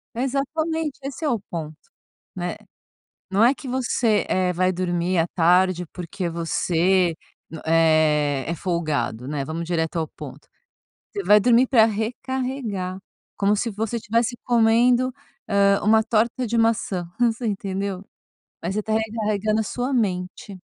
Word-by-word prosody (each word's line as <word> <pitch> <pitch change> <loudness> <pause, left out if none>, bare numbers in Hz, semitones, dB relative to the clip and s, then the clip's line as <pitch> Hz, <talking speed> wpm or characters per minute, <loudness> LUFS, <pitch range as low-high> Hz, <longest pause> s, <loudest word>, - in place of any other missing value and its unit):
Exatamente, 290 +4 -2
esse 275 +3 -5
é - - +2
o 235 -4 0
ponto, 160 -5 -7 0.6
né. 175 -1 -3 0.8
Não 200 +3 +4
é 250 +4 +5
que 275 - -9
você, 245 -4 +1
eh, 185 -1 +1
vai 185 +1 +2
dormir 175 0 -1
à 165 - +3
tarde, 180 +1 +3
porque 175 0 -4
você, 170 +1 +1 0.5
eh, 155 -4 +3
é 170 - -1
folgado, 150 - -2
né 145 -2 -2
vamos 160 +3 -4
direto 165 -1 -1
ao 160 - -2
ponto. - - -11 0.6
Você 405 - -4
vai 210 0 +6
dormir 240 +3 +4
para 230 -4 +6
recarregar 225 -3 -3 0.4
como 200 +1 +2
se 230 +3 -1
você 225 +2 -3
tivesse 230 +3 0
comendo. 240 +2 +3 0.4
Ah, 200 -1 +3
uma 220 +1 +4
torta 235 +3 +1
de 235 - -1
maçã. 225 -5 +1
Você 240 0 +1
entendeu, 195 -2 -3 0.6
mas 180 +4 -2
você 215 - 0
está 215 +1 -4
recarregando 215 -1 0
a - - +1
sua 245 +5 -3
mente. 190 -4 -2
200 Hz, 140 wpm, -23 LUFS, 175-235 Hz, 0.8 s, vai